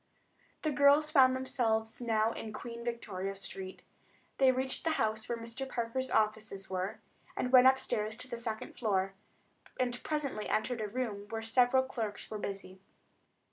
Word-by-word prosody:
The 310 Hz, -, +1 dB
girls 290 Hz, +2 st, +5 dB
found 260 Hz, -3 st, +6 dB
themselves 225 Hz, -4 st, 0 dB
now 225 Hz, -1 st, +2 dB
in 225 Hz, -1 st, -6 dB
Queen 235 Hz, +1 st, -7 dB
Victoria 195 Hz, -5 st, -3 dB
Street. 190 Hz, -1 st, -7 dB, 0.6 s
They 265 Hz, -1 st, +7 dB
reached 260 Hz, +1 st, -1 dB
the 325 Hz, -, +2 dB
house 220 Hz, 0 st, -1 dB
where 235 Hz, -, -1 dB
Mr. 230 Hz, +4 st, -5 dB
Parker's 245 Hz, +2 st, -2 dB
offices 215 Hz, -3 st, 0 dB
were, 185 Hz, +1 st, -3 dB, 0.4 s
went 255 Hz, 0 st, +7 dB
upstairs 220 Hz, -5 st, +1 dB
to 255 Hz, -, -6 dB
the 235 Hz, -2 st, -5 dB
second 225 Hz, -2 st, -4 dB
floor, 195 Hz, -4 st, 0 dB, 0.7 s
and 245 Hz, -1 st, 0 dB
presently 285 Hz, -8 st, -2 dB
entered 235 Hz, +1 st, 0 dB
a 215 Hz, -, -1 dB
room 205 Hz, -3 st, -3 dB
where 225 Hz, 0 st, -4 dB
several 250 Hz, +3 st, +4 dB
clerks 225 Hz, -6 st, -5 dB
were 215 Hz, -, -3 dB
busy. 195 Hz, -2 st, -6 dB
230 Hz, 150 wpm, -32 LUFS, 215-260 Hz, 0.7 s, They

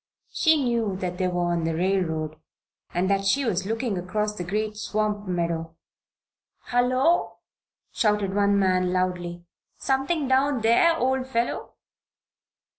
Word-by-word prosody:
She 315 Hz, -3 st, +3 dB
knew 230 Hz, -5 st, 0 dB
that 180 Hz, -1 st, -4 dB
they 185 Hz, -, +1 dB
were 175 Hz, -1 st, 0 dB
on 170 Hz, -1 st, 0 dB
the 165 Hz, 0 st, -1 dB
railroad, 160 Hz, -4 st, -1 dB, 0.5 s
and 180 Hz, +2 st, 0 dB
that 195 Hz, 0 st, +1 dB
she 260 Hz, +8 st, +2 dB
was 190 Hz, -4 st, -1 dB
looking 225 Hz, -3 st, -1 dB
across 210 Hz, +4 st, -2 dB
the 180 Hz, -, -5 dB
great 210 Hz, +4 st, -2 dB
swamp 210 Hz, -1 st, -2 dB
meadow. 170 Hz, -2 st, -2 dB, 1.0 s
"Hullo!" 255 Hz, +7 st, +2 dB, 0.5 s
shouted 210 Hz, -3 st, +1 dB
one 200 Hz, 0 st, +3 dB
man, 185 Hz, -2 st, +2 dB
loudly. 175 Hz, -1 st, -2 dB, 0.3 s
"Something 275 Hz, +3 st, 0 dB
down 265 Hz, -1 st, +2 dB
there, 235 Hz, +10 st, +4 dB
old 260 Hz, -2 st, 0 dB
fellow?" 235 Hz, -2 st, -2 dB
205 Hz, 130 wpm, -25 LUFS, 180-245 Hz, 1.0 s, there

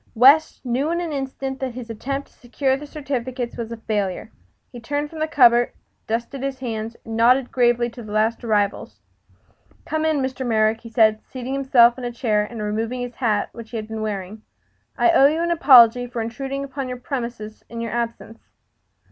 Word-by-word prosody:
West 275 Hz, +6 st, +5 dB
knew 255 Hz, +5 st, 0 dB
in 340 Hz, +1 st, 0 dB
an 340 Hz, -3 st, -3 dB
instant 270 Hz, -1 st, -4 dB
that 260 Hz, -3 st, -4 dB
his 250 Hz, -2 st, -7 dB
attempt 275 Hz, +5 st, -4 dB
to -, -, -28 dB
secure 265 Hz, +2 st, -1 dB
the 295 Hz, +2 st, -8 dB
certificates 260 Hz, -4 st, -4 dB
was 230 Hz, -1 st, -5 dB
a 230 Hz, -, -5 dB
failure. 210 Hz, -2 st, -3 dB, 0.4 s
He 245 Hz, -, -9 dB
turned 290 Hz, +5 st, -3 dB
from 320 Hz, -, -8 dB
the 310 Hz, -, 0 dB
cupboard, 245 Hz, -6 st, +4 dB, 0.3 s
dusted 235 Hz, +4 st, -3 dB
his 275 Hz, -1 st, -3 dB
hands, 230 Hz, -3 st, -5 dB
and 225 Hz, -, -5 dB
nodded 250 Hz, +3 st, +3 dB
gravely 240 Hz, -1 st, +2 dB
to 240 Hz, -, -10 dB
the 215 Hz, -2 st, -9 dB
last 220 Hz, +3 st, 0 dB
arrivals. 205 Hz, -3 st, -1 dB, 0.9 s
"Come 315 Hz, 0 st, -2 dB
in, 315 Hz, -1 st, +2 dB
Mr. 260 Hz, -1 st, -2 dB
Merrick," 220 Hz, -2 st, +2 dB
said 220 Hz, -1 st, +4 dB
he, -, -, -33 dB
seating 260 Hz, 0 st, -5 dB
himself 260 Hz, -3 st, +4 dB
in -, -, -8 dB
a 240 Hz, -, -3 dB
chair 225 Hz, -3 st, 0 dB
and 215 Hz, 0 st, -6 dB
removing 225 Hz, +4 st, -2 dB
his 245 Hz, 0 st, -5 dB
hat, 215 Hz, -5 st, 0 dB
which 230 Hz, -1 st, -10 dB
he 235 Hz, -, -5 dB
had 215 Hz, -1 st, -5 dB
been 220 Hz, 0 st, -5 dB
wearing. 210 Hz, 0 st, -5 dB, 0.6 s
"I 350 Hz, -, +4 dB
owe 280 Hz, -5 st, +6 dB
you 310 Hz, +3 st, 0 dB
an 340 Hz, 0 st, 0 dB
apology 245 Hz, -7 st, +6 dB
for 240 Hz, -1 st, -6 dB
intruding 270 Hz, +5 st, -4 dB
upon 275 Hz, -1 st, -5 dB
your 250 Hz, -, -4 dB
premises 235 Hz, -4 st, -6 dB
in 230 Hz, -, -7 dB
your 230 Hz, -1 st, -4 dB
absence." 230 Hz, -1 st, -4 dB
240 Hz, 200 wpm, -22 LUFS, 225-270 Hz, 0.9 s, owe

